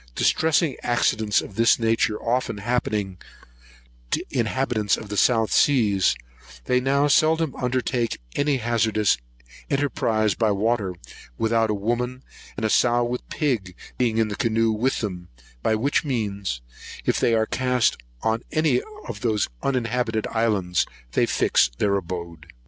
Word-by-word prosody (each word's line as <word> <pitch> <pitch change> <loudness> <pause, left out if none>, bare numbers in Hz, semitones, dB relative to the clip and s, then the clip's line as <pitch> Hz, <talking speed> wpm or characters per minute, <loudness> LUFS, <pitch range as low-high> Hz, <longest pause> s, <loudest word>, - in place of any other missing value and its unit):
Distressing 160 -3 +2
accidents 110 -3 +1
of - - -10
this 115 +3 +4
nature 115 -2 +1
often 120 -2 -1
happening 105 -4 -2 0.9
to - - -1
inhabitants 120 -3 0
of 105 - -9
the 105 - -4
South 115 0 +3
Seas, 105 -9 +3 0.5
they 125 - +2
now 140 +3 +2
seldom 160 +1 +3
undertake 125 -2 -1 0.2
any 145 -1 +1
hazardous 110 - +1 0.5
enterprise 115 -7 +1
by 110 +3 +1
water 105 -2 0 0.4
without 115 0 +1
a 105 - +1
woman, 120 +5 -2 0.3
and 110 - -2
a - - +1
sow 120 0 +3
with 120 +1 -4
pig, 115 - -1 0.2
being 115 -3 +1
in 110 -1 +3
the 100 - -4
canoe 115 -1 +1
with 120 +5 0
them; 90 -5 -5 0.3
by 110 - +2
which 135 +9 +1
means, 100 - -3 0.4
if - - +1
they 115 - +3
are 110 0 +2
cast 125 0 +1 0.3
on 110 +1 +1
any 155 - +2 0.3
of - - -6
those 110 -4 0
uninhabited 120 -4 -1
islands, 105 -6 +1 0.2
they - - +2
fix - - +3
their 100 -1 +1
abode. 85 -3 -5
115 Hz, 140 wpm, -24 LUFS, 105-125 Hz, 0.9 s, this